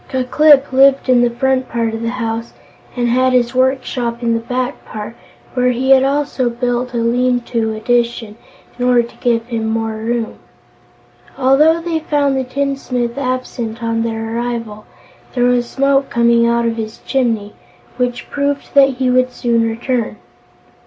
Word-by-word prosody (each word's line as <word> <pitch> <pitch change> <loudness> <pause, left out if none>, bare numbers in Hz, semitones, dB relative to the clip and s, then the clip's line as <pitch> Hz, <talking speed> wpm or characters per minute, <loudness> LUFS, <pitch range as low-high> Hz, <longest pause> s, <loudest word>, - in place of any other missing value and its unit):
Ku 260 -1 -1
Klip 285 +1 +4
lived 270 0 +4
in 250 -1 +5
the 240 - +3
front 260 +1 0
part 230 -1 -1
of 225 - -4
the 230 - -1
house 230 -1 -4 0.4
and 240 -1 0
had 255 +2 +2
his 245 0 +2
work 260 +1 +2
shop 240 -2 -4
in 230 -1 +1
the 230 - 0
back 250 +3 -3
part, 215 +1 -8 0.4
where 250 0 +2
he 255 +2 0
had 265 -1 +7
also 275 -2 0
built 245 +1 -2
a - - 0
lean 245 +2 +1
to 225 -2 -2
addition, 235 -1 -1 0.4
in 245 - 0
order 245 -1 +4
to 235 - -12
give 230 -2 0
him 230 -2 -3
more 225 0 -2
room. 230 +1 -3 1.0
Although 290 +5 +4
they 330 -1 -2
found 290 -3 0
the 265 - 0
tinsmith 255 -2 -2
absent 255 -3 -4
on 230 0 0
their 225 0 -3
arrival, 230 -3 -4 0.5
there 245 - +1
was 245 -1 +1
smoke 275 0 +1
coming 235 0 +3
out 235 0 +1
of 230 0 -1
his 220 0 -5
chimney, 225 -6 -1 0.4
which 250 -1 -2
proved 285 0 -2
that 275 -2 +5
he 255 0 0
would 255 0 +2
soon 235 -2 0
return. 230 0 -2
245 Hz, 170 wpm, -17 LUFS, 230-260 Hz, 1.0 s, had